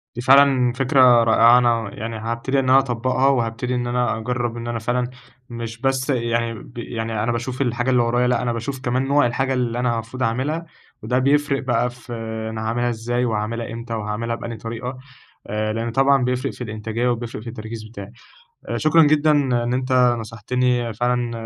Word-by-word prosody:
دي 120 - -4
فعلًا 135 -1 +5
فكرة 130 -2 +5
رائعة 115 +1 +6
أنا 115 -3 +2
يعني 115 +1 -5
هابتدي 115 +5 -1
إن 130 - 0
أنا 130 +1 +7
أطبّقها، 130 +1 0
وهابتدي 125 -1 0
إن 120 0 -2
أنا 120 -2 0
أجرّب 120 +1 -3
إن 120 0 -6
أنا 120 -1 -2
فعلًا 125 +2 -1 0.4
مش 115 -1 -7
بس 135 +1 0
يعني 115 -2 0
ب 115 +2 -12
يعني 115 -2 -3
أنا 120 - 0
باشوف 125 +3 -3
الحاجة 120 0 0
اللي 125 -2 +4
ورايا، 120 +1 +1
لأ 125 -1 +1
أنا 120 -1 -1
باشوف 125 +4 -4
كمان 130 +1 -1
نوع 145 +1 +3
الحاجة 130 +3 0
اللي 120 -2 -1
أنا 120 -2 0
مفروض 120 +3 -5
أعملها، 135 +9 -1 0.4
وده 125 +3 +1
بيفرِق 140 +1 +1
بقى 120 -1 +1
في 120 0 -11 0.4
أنا 110 0 -5
هاعملها 120 +2 0
إزاي، 120 +2 -1
وهاعملها 115 +1 -2
إمتى، 115 0 -6
وهاعملها 110 +2 -3
بأنهي 115 -1 -6
طريقة، 115 +3 -6 0.5
آآ 110 +1 -2
لأن 115 +1 -3
طبعًا 135 +1 +3
بيفرِق 125 +2 -1
في - - -7
الإنتاجية 110 +2 -3
و 120 - +2
بيفرٍق 115 -2 -7
في 115 - -7
التركيز 110 -1 -7
بتاعي. 110 -1 -10 0.6
آآ - - -1
شكرًا 160 +1 +5
جدًا 155 +1 +4
إن 125 -4 +1
أنت 130 0 -2 0.3
نصحتني 120 +2 -1
فعلًا، 120 +1 0
120 Hz, 185 wpm, -21 LUFS, 115-130 Hz, 0.6 s, أنا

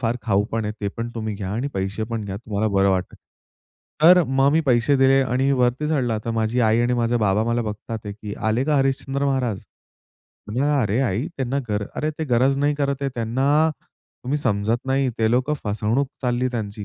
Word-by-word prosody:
फार 120 -1 0
खाऊ 100 -2 +2
पण 115 -1 -1
आहे 105 - -2
ते 100 - -1
पण 115 +1 -3
तुम्ही 110 -2 -3
घ्या 100 -2 -5
आणि 120 +6 -2
पैसे 95 +3 -2
पण 115 -2 -3
घ्या 95 -1 -5
तुम्हाला 110 0 -2
बरं 100 0 +4
वाटेल. 95 -1 -2 0.9
तर 180 +2 +8
मग 135 +1 +3
मी 160 - +4
पैसे 125 +2 +3
दिले 135 0 +4
आणि 130 +1 +1
वरती 125 +5 +1
चढला 125 -8 0
तर 115 - -2
माझी 110 +3 0
आई 110 0 +3
आणि 120 +1 +1
माझे 120 0 +1
बाबा 105 -1 +2
मला 115 +1 0
बघतात 105 +1 -6
की 105 0 -7
आले 115 +4 +1
का 150 0 +1
हरिश्चंद्र 135 +1 0
महाराज. 130 -7 -1 0.8
म्हटलं 130 +8 0
अरे 110 0 0
आई 120 - 0
त्यांना 135 +1 -1
गर 105 -1 -1
अरे, 155 - -1
ते 155 +1 -5
गरज 130 +1 +2
नाही 145 +1 +2
करत 140 -1 -1
आहे. 135 - 0
त्यांना 135 +7 +2 0.5
तुम्ही 140 +4 0
समजत 115 -1 0
नाही 135 0 +1
ते 110 -1 +2
लोकं 130 +5 +1
फसवणूक 110 +6 0
चालली 125 0 0
त्यांची. 105 -3 -4
120 Hz, 200 wpm, -22 LUFS, 110-135 Hz, 0.9 s, तर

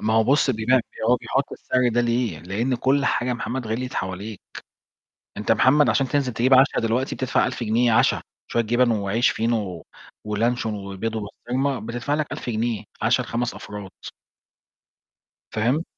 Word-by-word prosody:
ما 110 +1 +1
هو 110 0 +4
بُص 135 +3 +3
بيبيع 115 +1 +1
يعني 125 - +3 0.3
هو 125 - +5
بيحُط 135 +2 -2
السعر 125 -1 0
ده 120 +1 +1
ليه؟ 120 -7 0
لإن 100 - -1
كلّ 135 +3 +2
حاجة 125 - +1
يا 125 - +1
محمد 120 +1 -4
غِلْيِت 125 +4 -3
حواليك، 95 +3 -4 1.0
أنت - - -3
يا - - +7
محمد 145 +3 +4
عشان 135 -2 +2
تنزل 135 -2 0
تجيب 125 +4 +3
عَشَا 135 +2 +5
دلوقتي 115 +4 0
بتدفع 130 -1 +1
1000 125 0 -4
جنيه 115 +2 +2
عَشَا، 110 - +3 0.3
شوية 115 - +2
جِبَن 120 +2 +2
وعيش 110 +2 +2
فينو، 115 +1 0
و 85 -2 -9 0.4
ولانشون 110 +1 0
وبيض 100 +2 -4
وبسطرمة، 125 +5 -2
بتدفع 120 +5 -3
لك 150 -1 -2
1000 - - -4
جنيه، 115 -1 -1 0.2
عَشَا 120 +3 +3
ل5 120 0 -2
أفراد. 100 -2 -8 1.6
فاهم؟ 125 +9 0
120 Hz, 170 wpm, -23 LUFS, 110-130 Hz, 1.6 s, يا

